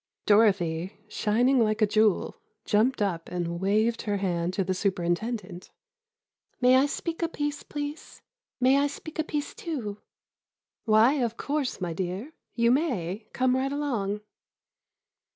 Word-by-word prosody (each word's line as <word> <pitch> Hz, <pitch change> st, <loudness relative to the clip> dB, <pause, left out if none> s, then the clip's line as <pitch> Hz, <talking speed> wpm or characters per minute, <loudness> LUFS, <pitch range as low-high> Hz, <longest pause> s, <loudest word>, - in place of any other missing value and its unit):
Dorothy, 190 Hz, -5 st, +3 dB
shining 240 Hz, +5 st, +2 dB
like 215 Hz, -2 st, +2 dB
a 215 Hz, -, +5 dB
jewel, 215 Hz, -1 st, +2 dB, 0.3 s
jumped 220 Hz, +2 st, +2 dB
up 170 Hz, -5 st, -2 dB
and 170 Hz, -1 st, -3 dB
waved 215 Hz, +4 st, +2 dB
her 205 Hz, -2 st, -1 dB
hand 175 Hz, -3 st, -1 dB
to 195 Hz, -, +1 dB
the 185 Hz, +1 st, -1 dB
superintendent: 185 Hz, +1 st, -2 dB, 0.9 s
"May 255 Hz, 0 st, +5 dB
I 270 Hz, +2 st, +4 dB
speak 330 Hz, +3 st, -4 dB
a 335 Hz, -, +2 dB
piece, 295 Hz, -3 st, -3 dB
please—may 290 Hz, -, -2 dB
I 285 Hz, -, +3 dB
speak 310 Hz, +2 st, -9 dB
a -, -, +3 dB
piece, 295 Hz, -2 st, -3 dB
too?" 230 Hz, -11 st, -5 dB, 0.9 s
"Why, 225 Hz, +6 st, +5 dB
of 235 Hz, -1 st, -1 dB
course, 285 Hz, -2 st, -2 dB
my 175 Hz, -3 st, -3 dB
dear, 190 Hz, -, -4 dB, 0.2 s
you 235 Hz, 0 st, +3 dB
may; 215 Hz, -, -1 dB
come 255 Hz, 0 st, +2 dB
right 265 Hz, +1 st, 0 dB
along." 230 Hz, -9 st, -2 dB
220 Hz, 135 wpm, -27 LUFS, 195-275 Hz, 0.9 s, a